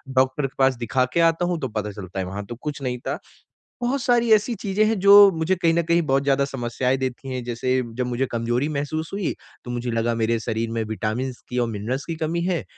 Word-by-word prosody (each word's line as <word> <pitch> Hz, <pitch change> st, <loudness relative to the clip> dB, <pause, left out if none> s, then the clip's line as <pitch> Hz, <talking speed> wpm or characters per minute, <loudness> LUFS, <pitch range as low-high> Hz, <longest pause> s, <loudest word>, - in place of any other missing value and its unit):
Doctor 130 Hz, +2 st, +2 dB
के 135 Hz, -, -18 dB
पास 135 Hz, -1 st, +4 dB
दिखा 125 Hz, +2 st, +1 dB
के -, -, +2 dB
आता 165 Hz, +1 st, +3 dB
हूँ 175 Hz, -1 st, -1 dB
तो 130 Hz, -, -2 dB
पता 105 Hz, -2 st, -3 dB
चलता 95 Hz, -2 st, -7 dB
है 95 Hz, -, -1 dB
वहाँ 100 Hz, +2 st, -5 dB
तो 120 Hz, -, -7 dB
कुछ 145 Hz, +4 st, -6 dB
नहीं 125 Hz, -2 st, -2 dB
था। -, -, -1 dB, 0.6 s
बहुत 255 Hz, +3 st, 0 dB
सारी 240 Hz, -3 st, +2 dB
ऐसी 215 Hz, +3 st, +3 dB
चीज़ें 200 Hz, +1 st, 0 dB
हैं 220 Hz, -1 st, +1 dB
जो 200 Hz, +1 st, +9 dB
मुझे 160 Hz, +4 st, +1 dB
कहीं 170 Hz, -2 st, +2 dB
न 170 Hz, -, +3 dB
कहीं 170 Hz, +1 st, +2 dB
बहुत 135 Hz, -3 st, +1 dB
ज़्यादा 140 Hz, 0 st, +2 dB
समस्याएँ 130 Hz, -1 st, -1 dB
देती 130 Hz, 0 st, -4 dB
हैं। 125 Hz, -1 st, -3 dB
जैसे 125 Hz, +2 st, 0 dB
जब 125 Hz, +1 st, -1 dB
मुझे 125 Hz, +2 st, 0 dB
कमजोरी 120 Hz, +4 st, 0 dB
महसूस 155 Hz, +2 st, -3 dB
हुई 200 Hz, -4 st, -1 dB, 0.3 s
तो 120 Hz, -, -6 dB
मुझे 120 Hz, 0 st, -3 dB
लगा 115 Hz, +1 st, 0 dB
मेरे 115 Hz, 0 st, +1 dB
शरीर 115 Hz, +1 st, -2 dB
में 115 Hz, -1 st, -1 dB
विटामिन्स 110 Hz, +3 st, -3 dB
की 125 Hz, -, -4 dB
और 120 Hz, -, +1 dB
मिनरल्स 115 Hz, +6 st, -3 dB
की 165 Hz, -, -4 dB
कमी 160 Hz, +2 st, -2 dB
है। 180 Hz, -2 st, 0 dB
130 Hz, 235 wpm, -23 LUFS, 120-165 Hz, 0.6 s, जो